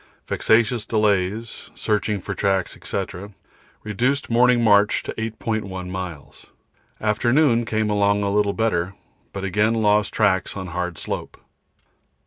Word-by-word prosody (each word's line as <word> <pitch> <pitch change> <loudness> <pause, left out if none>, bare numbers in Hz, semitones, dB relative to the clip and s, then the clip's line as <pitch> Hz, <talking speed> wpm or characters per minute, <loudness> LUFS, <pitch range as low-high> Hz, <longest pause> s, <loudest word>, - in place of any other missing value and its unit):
Vexatious 115 0 +2
delays, 105 0 0
searching 105 -1 -1
for 100 - -4
tracks, 95 -2 0
&c., - - -2 0.8
reduced 125 +6 -1
morning 120 0 +4
march 105 -1 +4
to - - -5
8.1 110 -4 -4
miles. 90 -6 -7 0.5
Afternoon, 120 +3 +2
came 110 -1 0
along 100 0 +2
a 100 0 0
little 105 -1 +2
better, 95 -5 -1 0.4
but 95 - -6
again 105 +4 +1
lost 105 -2 +2
tracks 100 -2 +1
on 95 -2 -5
hard 90 -1 -3
slope. - - -5
105 Hz, 120 wpm, -22 LUFS, 95-110 Hz, 0.8 s, morning